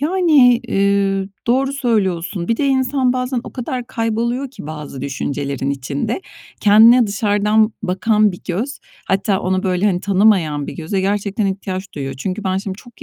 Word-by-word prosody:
Yani, 300 Hz, -7 st, +4 dB
eee, 195 Hz, -2 st, +1 dB, 0.2 s
doğru 265 Hz, +3 st, +2 dB
söylüyorsun. 190 Hz, -9 st, -1 dB
Bir 230 Hz, -, +1 dB
de 285 Hz, -, 0 dB
insan 260 Hz, -1 st, +1 dB
bazen 255 Hz, 0 st, -2 dB
o -, -, -9 dB
kadar 250 Hz, -1 st, -4 dB
kayboluyor 235 Hz, +2 st, -2 dB
ki 250 Hz, -, -10 dB
bazı 150 Hz, -3 st, -7 dB
düşüncelerin 140 Hz, 0 st, -3 dB
içinde, 140 Hz, -, -3 dB, 0.4 s
kendine 225 Hz, +4 st, +6 dB
dışarıdan 210 Hz, +1 st, +1 dB
bakan 210 Hz, +2 st, +2 dB
bir 180 Hz, -, -10 dB
göz, 225 Hz, +11 st, -3 dB, 0.3 s
hatta 195 Hz, 0 st, +1 dB
onu, 185 Hz, 0 st, 0 dB
böyle, 185 Hz, +2 st, +1 dB
hani, 180 Hz, -3 st, +1 dB
tanımayan 185 Hz, -8 st, +2 dB
bir -, -, -6 dB
göze 175 Hz, +4 st, -2 dB
gerçekten 200 Hz, +1 st, -1 dB
ihtiyaç 190 Hz, 0 st, -4 dB
duyuyor. 135 Hz, -2 st, -4 dB
Çünkü 185 Hz, +9 st, -4 dB
ben 190 Hz, -1 st, 0 dB
şimdi 190 Hz, 0 st, -4 dB
çok 240 Hz, +1 st, -15 dB
200 Hz, 155 wpm, -18 LUFS, 185-240 Hz, 0.4 s, kendine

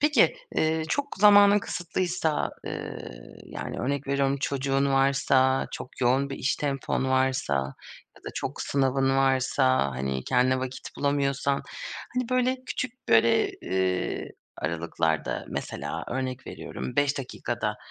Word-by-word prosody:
Peki, 295 Hz, -, +4 dB, 0.2 s
eee, 160 Hz, 0 st, +1 dB
çok 285 Hz, -, -2 dB
zamanın 205 Hz, 0 st, +7 dB
kısıtlıysa, 175 Hz, -4 st, -1 dB, 0.2 s
ııı, -, -, -5 dB, 0.4 s
yani, -, -, -6 dB
örnek 140 Hz, +2 st, -2 dB
veriyorum 140 Hz, 0 st, +1 dB
çocuğun 135 Hz, 0 st, 0 dB
varsa, 135 Hz, -1 st, +3 dB
çok 125 Hz, -, -8 dB
yoğun 130 Hz, +3 st, +2 dB
bir 135 Hz, -, -4 dB
iş 140 Hz, -, 0 dB
tempon 140 Hz, -2 st, -1 dB
varsa 130 Hz, -, +1 dB, 0.6 s
ya -, -, -20 dB
da -, -, -4 dB
çok -, -, -4 dB
sınavın 135 Hz, 0 st, +1 dB
varsa, 130 Hz, -, +3 dB
hani, 65 Hz, 0 st, -3 dB
kendine 130 Hz, +1 st, +3 dB
vakit 130 Hz, 0 st, -5 dB
bulamıyorsan, 140 Hz, -1 st, 0 dB, 0.5 s
hani, 250 Hz, -1 st, -1 dB
böyle, 255 Hz, +1 st, +2 dB
küçük, 255 Hz, 0 st, -5 dB
böyle, 115 Hz, 0 st, +4 dB
ııı, 95 Hz, -8 st, -1 dB, 0.3 s
aralıklarda 80 Hz, 0 st, -1 dB
mesela, -, -, -4 dB
örnek 130 Hz, 0 st, -3 dB
veriyorum 65 Hz, 0 st, -6 dB
5 145 Hz, 0 st, +2 dB
dakikada, 130 Hz, -, -3 dB
135 Hz, 125 wpm, -27 LUFS, 130-145 Hz, 0.6 s, zamanın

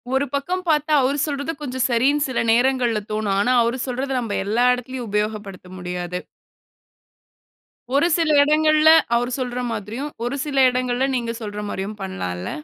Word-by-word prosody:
ஒரு 270 Hz, +1 st, +2 dB
பக்கம் 350 Hz, +7 st, -1 dB
பார்த்தா 300 Hz, 0 st, +1 dB
அவரு 270 Hz, +2 st, +1 dB
சொல்றது 285 Hz, +2 st, -3 dB
கொஞ்சம் 260 Hz, -3 st, -2 dB
சரின்னு 275 Hz, +5 st, +2 dB
சில 260 Hz, -, -2 dB
நேரங்கள்ல 245 Hz, -1 st, +2 dB
தோணும். 215 Hz, -2 st, -1 dB
ஆனா 245 Hz, +5 st, +2 dB
அவரு 235 Hz, +2 st, -1 dB
சொல்றத 260 Hz, +2 st, -3 dB
நம்ம 225 Hz, -4 st, -3 dB
எல்லா 225 Hz, +5 st, +2 dB
இடத்துலயும் 250 Hz, 0 st, -5 dB
உபயோகப்படுத்த 210 Hz, -3 st, -3 dB
முடியாது. 180 Hz, 0 st, -4 dB, 1.8 s
ஒரு 290 Hz, +4 st, +4 dB
சில 325 Hz, -2 st, +1 dB
இடங்கள்ல 310 Hz, +1 st, +4 dB, 0.3 s
அவர் 245 Hz, +1 st, 0 dB
சொல்ற 250 Hz, -1 st, -3 dB
மாதிரியும், 225 Hz, +7 st, -5 dB
ஒரு 245 Hz, +3 st, -2 dB
சில 285 Hz, -2 st, -4 dB
இடங்கள்ல 250 Hz, +1 st, 0 dB
நீங்க 235 Hz, -2 st, -2 dB
சொல்ற 210 Hz, -1 st, -5 dB
மாரியும் 200 Hz, +2 st, -5 dB
பண்ணலால்ல! 90 Hz, -, -4 dB
245 Hz, 145 wpm, -21 LUFS, 210-280 Hz, 1.8 s, ஒரு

